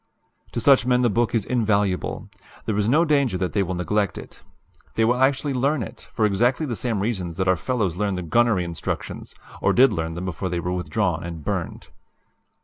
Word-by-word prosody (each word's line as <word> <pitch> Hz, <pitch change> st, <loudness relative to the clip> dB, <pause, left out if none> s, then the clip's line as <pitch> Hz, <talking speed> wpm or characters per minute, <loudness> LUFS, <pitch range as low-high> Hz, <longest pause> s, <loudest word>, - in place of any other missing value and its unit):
"To -, -, -1 dB
such 140 Hz, -3 st, +5 dB
men 125 Hz, 0 st, +3 dB
the 120 Hz, -, +3 dB
book 120 Hz, +2 st, +1 dB
is 110 Hz, -3 st, +1 dB
invaluable. 105 Hz, -6 st, 0 dB, 0.4 s
There 110 Hz, -, -1 dB
is 105 Hz, +1 st, +1 dB
no 155 Hz, +7 st, +4 dB
danger 140 Hz, -, +2 dB
that 90 Hz, -1 st, -2 dB
they 100 Hz, -, +2 dB
will 95 Hz, -1 st, -2 dB
neglect 100 Hz, +3 st, 0 dB
it. -, -, -11 dB, 0.5 s
They 115 Hz, -, +3 dB
will 125 Hz, +3 st, +1 dB
actually 135 Hz, +1 st, +2 dB
learn 135 Hz, +1 st, +1 dB
it, -, -, -10 dB
for 110 Hz, -, +1 dB
exactly 120 Hz, +9 st, +2 dB
the 120 Hz, -5 st, -3 dB
same 110 Hz, -3 st, -2 dB
reasons 95 Hz, -6 st, -2 dB
that 95 Hz, -1 st, 0 dB
our 95 Hz, -, +4 dB
fellows 95 Hz, 0 st, -1 dB
learn 100 Hz, -1 st, 0 dB
the 90 Hz, -, -4 dB
gunnery 105 Hz, +3 st, +2 dB
instructions 85 Hz, -2 st, -5 dB, 0.3 s
or -, -, +3 dB
did 130 Hz, -2 st, +5 dB
learn 80 Hz, -3 st, -3 dB
them 90 Hz, +2 st, -5 dB
before 95 Hz, +1 st, -3 dB
they 85 Hz, 0 st, -2 dB
were 90 Hz, +1 st, -2 dB
withdrawn 90 Hz, -2 st, -1 dB
and 85 Hz, -3 st, -7 dB
burned. -, -, -4 dB
105 Hz, 205 wpm, -23 LUFS, 90-125 Hz, 0.5 s, such